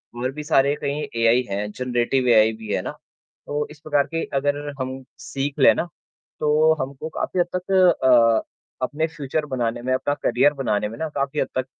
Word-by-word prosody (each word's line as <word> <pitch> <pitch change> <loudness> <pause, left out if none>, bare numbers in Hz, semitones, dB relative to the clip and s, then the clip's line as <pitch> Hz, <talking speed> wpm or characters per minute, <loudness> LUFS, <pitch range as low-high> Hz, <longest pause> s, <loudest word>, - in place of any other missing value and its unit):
और 125 +2 -2
भी 150 +2 -7
सारे 140 -2 +3
कहीं 145 +1 -2 0.2
एआई 115 +2 +4
हैं, 105 +1 -3
जनरेटिव 125 +1 0
एआई 110 -1 +6
भी 110 -2 -5
है - - 0
ना। - - -5 0.6
तो 145 0 -2
इस 150 - -14
प्रकार 145 -2 +1
की 165 0 -3 0.2
अगर 145 +1 0 0.2
हम 130 +1 -4 0.2
सीख 140 +1 -4
लें - - +7
ना, - - -1 0.5
तो 155 +1 +4
हमको 140 +4 -5
काफ़ी 180 - -3
हद 175 - +2
तक 185 +1 -4 0.3
अ, 115 -3 +5 0.4
अपने 155 +4 -2
फ्यूचर 155 -1 -3
बनाने 120 -3 -2
में, 130 +1 -1
अपना 145 +2 0
करियर 135 +5 +3
बनाने 105 -6 -1
में 115 - -9
ना 160 -1 -3
काफ़ी 140 +1 -1
हद - - +1
तक 130 - -2
135 Hz, 195 wpm, -22 LUFS, 120-150 Hz, 0.6 s, लें